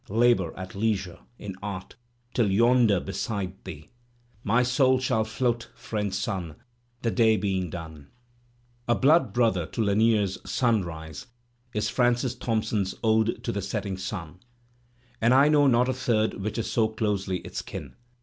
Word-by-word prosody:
Labour, 110 -5 +3
at 95 0 -7
leisure, 100 -4 -1 0.2
in 100 -3 -7
art, 100 -2 -6 0.2
— 120 0 -40
till 115 -5 +2
yonder 115 -1 +4
beside 95 0 -4
thee 75 -1 -9 0.5
My 120 +5 +3
soul 130 +1 +3
shall 125 -4 +1
float, 120 +1 -1
friend 105 -4 -3
Sun, 95 -5 -3 0.5
The 115 - +1
day 110 -2 +4
being 95 -4 -1
done. 80 -4 -8 0.8
A 120 - +3
blood 155 +7 +4
brother 110 -9 +1
to 115 - -2
Lanier's 105 -1 +2
"Sunrise" 90 -3 -2 0.5
is 105 - 0
Francis 125 0 +1
Thomp 115 -3 -1
son's 100 -4 -1
"Ode 110 0 +2
to 115 - -1
the 100 - -3
Setting 100 0 -3
Sun," 90 -3 -6 0.8
and 120 +3 +4
I 140 +3 +6
know 145 -2 +5
not 125 -1 +4
a 130 - +1
third 110 -3 +1
which 105 +2 -4
so 110 -2 +1
is 110 - -16
closely 100 -4 -1
its - - -6
kin. - - -8
110 Hz, 155 wpm, -26 LUFS, 95-120 Hz, 0.8 s, I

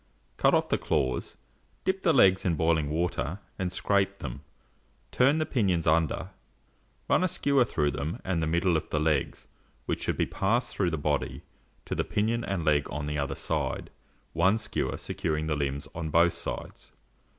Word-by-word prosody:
Cut - - +4
off - - +1
the - - +1
claws; 65 -1 -1 0.5
dip 190 0 0
the 170 - +4
legs 95 -9 +5
in 85 -3 +1
boiling 80 -2 +2
water, 80 -1 -1 0.2
and 90 -1 -1
scrape 100 +1 +1
them; 65 -4 -6 0.7
turn 135 +4 +4
the 155 - +1
pinions 95 - +1
under, 80 -1 +1 0.8
run - - +3
a - - +3
skewer 140 -7 +2
through 75 -10 0
them 75 +5 -4
and 90 -3 0
the 80 - 0
middle 85 +2 +2
of 80 - -5
the 75 - 0
legs, 75 -3 0 0.4
which - - -2
should - - -1
be - - +2
passed 115 +6 0
through 95 -3 +1
the 80 - -2
body 75 -1 -1 0.4
to - - -3
the - - 0
pinion 115 +3 0
and 95 -7 -2
leg 75 -2 +2
on 75 +1 -3
the 75 0 -2
other 70 - -2
side, - - -2 0.4
one 95 +6 +3
skewer 110 -1 -2
securing 80 -1 -2
the 80 -1 0
limbs 70 0 -2
on 80 -2 -4
both 85 +2 +4
sides. - - -7
85 Hz, 180 wpm, -28 LUFS, 75-100 Hz, 0.8 s, legs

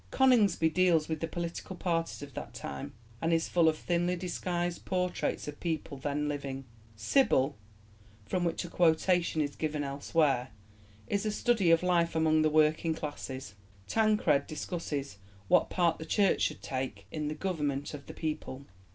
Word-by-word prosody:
Coningsby 210 -11 +4
deals 170 -2 +3
with 160 -1 -2
the 165 - -2
political 170 +3 -5
parties 165 -4 -2
of 140 -1 -10
that - - -7
time, 70 -1 -6 0.3
and 165 - +1
is 165 0 +2
full 170 -2 +4
of 155 - -1
thinly 175 +2 0
disguised 175 -1 -2
portraits 180 -4 -1
of 150 0 -7
people 160 -4 -3
then 145 +2 -2
living; 140 -2 -4 0.3
Sybil, 140 - +2 0.7
from 175 - -1
which 170 +1 -1
a - - -5
quotation 170 0 +2
is 145 -1 -2
given 155 -2 -2
elsewhere, 140 -2 +1 0.6
is 200 -1 0
a 215 - 0
study 210 -4 +2
of 165 +1 +5
life 170 -2 +2
among 160 -1 +3
the 155 - +3
working 155 +1 +3
classes; 135 -7 -6 0.3
Tancred 210 -10 +2
discusses 145 - -4 0.3
what - - +4
part 170 -3 +1
the 160 - -6
Church 200 -2 +3
should - - -1
take 130 -7 -4
in 150 -1 -3
the 150 - -3
government 150 -6 -2
of 140 -1 -8
the - - -8
people. 145 -4 -4
160 Hz, 160 wpm, -30 LUFS, 145-175 Hz, 0.7 s, of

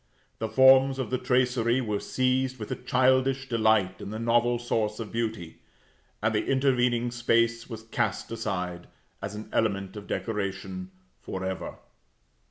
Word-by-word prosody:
The 110 - -2
forms 130 +3 +6
of 130 -3 -3
the 130 - 0
tracery 125 -1 +2
were 105 -5 -1
seized 130 0 0
with 105 -3 -7
a - - 0
childish 130 +1 +2
delight 110 -5 +2
in - - -6
the 110 - -5
novel 120 +1 +2
source 110 -2 -1
of 110 -2 -6
beauty; 110 -8 -3 0.6
and 110 +1 +2
the 105 - +1
intervening 125 -3 +1
space 115 0 +1
was 110 -2 -7
cast 115 - -2
aside, 90 -6 -3 0.3
as 100 +1 -5
an 105 +1 -7
element 100 -3 0
of 105 -1 -8
decoration, 105 - -3 0.3
for 95 0 -5
ever. 95 0 -4
115 Hz, 150 wpm, -27 LUFS, 105-130 Hz, 0.6 s, forms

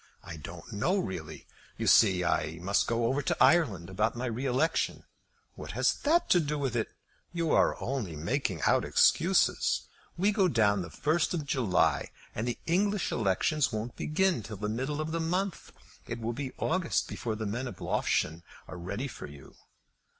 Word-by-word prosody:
"I 80 - -8
don't 80 - -9
know 170 - +1
really. 80 - -5 0.3
You - - -3
see 95 -5 +5
I 80 -2 0
must 100 +3 +1
go 115 0 0
over 135 +5 +1
to - - -1
Ireland 130 - +4
about 105 +5 0
my 120 +2 -3
re 125 +3 -2
election." 135 +6 0 0.5
"What - - -8
has - - +2
that 330 +4 +2
to 175 - +6
do 150 -2 -1
with 135 -4 -2
it? 115 - 0 0.4
You 170 -2 -1
are - - +3
only 120 - -3
making 90 - -2
out - - +3
excuses. - - +3 0.3
We 195 +4 +3
go 195 -3 +3
down 105 - +3
on - - -1
the 85 - -6
first 155 - 0
of 155 -4 -3
July, 120 -10 +1 0.2
and 110 +3 -3
the 120 - -2
English 200 +3 +1
elections 120 - +1
won't 110 +2 -4
begin 175 -2 +1
till 105 0 -8
the 105 +2 -3
middle 135 +7 -2
of 155 +1 -3
the 165 - -1
month. 180 +3 -2 0.4
It - - -4
will 115 +1 -2
be 130 0 -5
August 180 0 0
before 110 -2 -4
the 110 0 -4
men 120 +6 -3
of - - -8
Loughshane 80 +2 0 0.3
are 90 - -8
ready 100 +10 -4
for - - -8
you." 70 -2 -13
120 Hz, 185 wpm, -29 LUFS, 100-155 Hz, 0.5 s, to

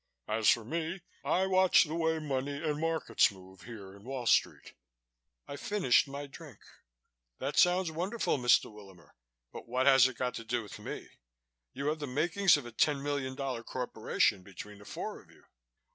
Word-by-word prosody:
As 110 0 +2
for 115 -2 +3
me, 165 - -3 0.2
I 185 +2 +2
watch 190 -1 +5
the 155 - -6
way 160 -1 +1
money 140 -2 -3
and 150 -2 -1
markets 165 -3 +2
move 95 -1 -15
here 100 -5 -10
in 100 - -16
Wall 130 0 -5
Street." - - +1 0.7
I 140 - -6
finished 180 -7 +2
my 140 +1 -6
drink. 140 -4 -12 0.8
"That 135 +2 -3
sounds 180 -2 +4
wonderful, 180 0 -1
Mr. 120 -2 +3
Willamer, 95 -7 -15 0.4
but - - -9
what 130 +2 0
has 135 -2 +7
it 130 -3 -8
got 125 -1 -1
to 115 - -6
do 120 +1 -2
with 105 - -10
me? - - -7 0.7
You 140 - -4
have 155 +1 -2
the 145 - -4
makings 165 +7 +3
of 145 - -7
a 120 - -8
ten 140 +4 +1
million 140 -2 -2
dollar 130 -4 -4
corporation 110 -5 0
between 100 +2 -11
the 105 - -14
four - - -6
of - - -24
you." - - -21
135 Hz, 180 wpm, -31 LUFS, 115-160 Hz, 0.8 s, has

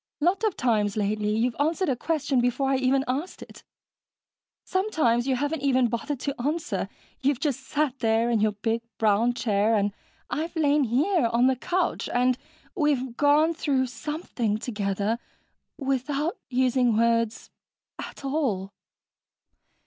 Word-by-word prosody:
Lot 360 +7 +1
of 430 -4 +1
times, 215 -4 +1
lately, 210 +1 0
you've 235 +1 +1
answered 325 +6 +1
a 265 - +1
question 285 -1 0
before 255 +3 +1
I 270 - +3
even 265 +1 +2
asked 280 +8 -3
it. - - -14 1.0
Sometimes 305 - +1
you 265 - +2
haven't 290 +3 -2
even 260 -3 +3
bothered 260 +4 -3
to 280 - -1
answer 315 +6 -2 0.3
you've 275 -2 +1
just 285 -5 -1
sat 275 0 -1
there 225 0 +2
in 230 - +2
your 215 0 +2
big 225 +3 -1 0.2
brown 225 +3 +2
chair 215 -1 +2
and 205 -1 +1 0.3
I've 325 +3 -3
lain 295 -2 +3
here 275 - +2
on 235 +2 +2
the 260 0 +4
couch, 360 +8 -1
and 250 +1 +2 0.4
we've 275 - 0
gone 300 +4 +4
through 275 -5 0
something 250 -4 -3
together 210 0 -2 0.6
without 275 +3 -1
using 250 -2 +2
words 230 -1 +1 0.5
at - - -8
all...." 235 -10 -1
255 Hz, 140 wpm, -26 LUFS, 230-295 Hz, 1.0 s, the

